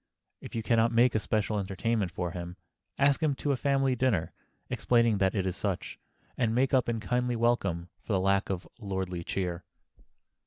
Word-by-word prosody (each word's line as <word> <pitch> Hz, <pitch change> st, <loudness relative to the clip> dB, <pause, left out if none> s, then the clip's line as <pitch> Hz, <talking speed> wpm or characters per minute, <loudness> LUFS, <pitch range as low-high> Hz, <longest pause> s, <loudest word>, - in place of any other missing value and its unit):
If -, -, -9 dB
you 115 Hz, -, -2 dB
can 115 Hz, +1 st, +2 dB
not 115 Hz, +1 st, +3 dB
make 120 Hz, +1 st, +4 dB
a 110 Hz, -, +2 dB
special 105 Hz, 0 st, 0 dB
entertainment 100 Hz, +1 st, -1 dB
for 90 Hz, 0 st, -3 dB
him, 90 Hz, 0 st, -6 dB, 0.4 s
ask 140 Hz, +1 st, +3 dB
him 150 Hz, -3 st, +2 dB
to 145 Hz, -, -1 dB
a -, -, +2 dB
family 135 Hz, 0 st, +1 dB
dinner, 115 Hz, -10 st, 0 dB, 0.3 s
explaining 115 Hz, -4 st, +2 dB
that 95 Hz, +1 st, +2 dB
it 95 Hz, -2 st, 0 dB
is 95 Hz, -1 st, -1 dB
such, 100 Hz, -2 st, -3 dB, 0.4 s
and 115 Hz, -2 st, +1 dB
make 130 Hz, +2 st, +2 dB
up 130 Hz, -3 st, +3 dB
in 115 Hz, -1 st, -1 dB
kindly 125 Hz, +2 st, 0 dB
welcome 100 Hz, -8 st, +1 dB
for 110 Hz, -, -4 dB
the 95 Hz, -, +3 dB
lack 100 Hz, +1 st, +2 dB
of 95 Hz, -2 st, -3 dB
lordly 95 Hz, -4 st, -3 dB
cheer. 90 Hz, -1 st, -3 dB
110 Hz, 190 wpm, -29 LUFS, 95-120 Hz, 0.4 s, make